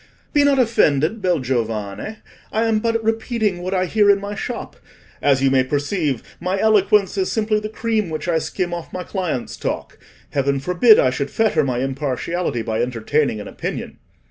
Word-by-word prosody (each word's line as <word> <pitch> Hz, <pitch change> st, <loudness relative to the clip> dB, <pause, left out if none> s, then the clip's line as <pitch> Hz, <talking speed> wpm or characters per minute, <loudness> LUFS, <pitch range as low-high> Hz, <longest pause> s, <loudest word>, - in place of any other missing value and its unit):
"Be 290 Hz, -2 st, +4 dB
not 285 Hz, -1 st, +4 dB
offended, 215 Hz, -, +2 dB
bel 180 Hz, -2 st, +2 dB
giovane; 115 Hz, -, -3 dB, 0.3 s
I 220 Hz, -, +1 dB
am 225 Hz, -1 st, +2 dB
but 230 Hz, 0 st, 0 dB
repeating 220 Hz, -3 st, 0 dB
what 185 Hz, +2 st, -2 dB
I 185 Hz, 0 st, +1 dB
hear 205 Hz, +2 st, +3 dB
in 200 Hz, 0 st, +5 dB
my 200 Hz, +1 st, -5 dB
shop; 235 Hz, +3 st, -5 dB, 0.5 s
as 135 Hz, -2 st, +3 dB
you 135 Hz, -, +4 dB
may 130 Hz, -1 st, +4 dB
perceive, 145 Hz, -, -1 dB, 0.2 s
my 185 Hz, +3 st, -1 dB
eloquence 205 Hz, -2 st, +3 dB
is 185 Hz, -, 0 dB
simply 215 Hz, -1 st, +1 dB
the 215 Hz, 0 st, -5 dB
cream 220 Hz, -3 st, -1 dB
which 155 Hz, +2 st, -4 dB
I 165 Hz, -2 st, +2 dB
skim 175 Hz, +2 st, -3 dB
off 170 Hz, -1 st, -6 dB
my 180 Hz, -, -4 dB
clients' 180 Hz, -, -3 dB
talk. -, -, -4 dB, 0.3 s
Heaven 140 Hz, 0 st, +1 dB
forbid 180 Hz, -, +5 dB
I 130 Hz, -, +4 dB
should 140 Hz, +2 st, -2 dB
fetter 220 Hz, 0 st, +2 dB
my 125 Hz, -3 st, -1 dB
impartiality 135 Hz, 0 st, -2 dB
by 110 Hz, 0 st, -1 dB
entertaining 125 Hz, +1 st, 0 dB
an 105 Hz, -, -7 dB
opinion. -, -, -5 dB
180 Hz, 180 wpm, -21 LUFS, 135-215 Hz, 0.5 s, in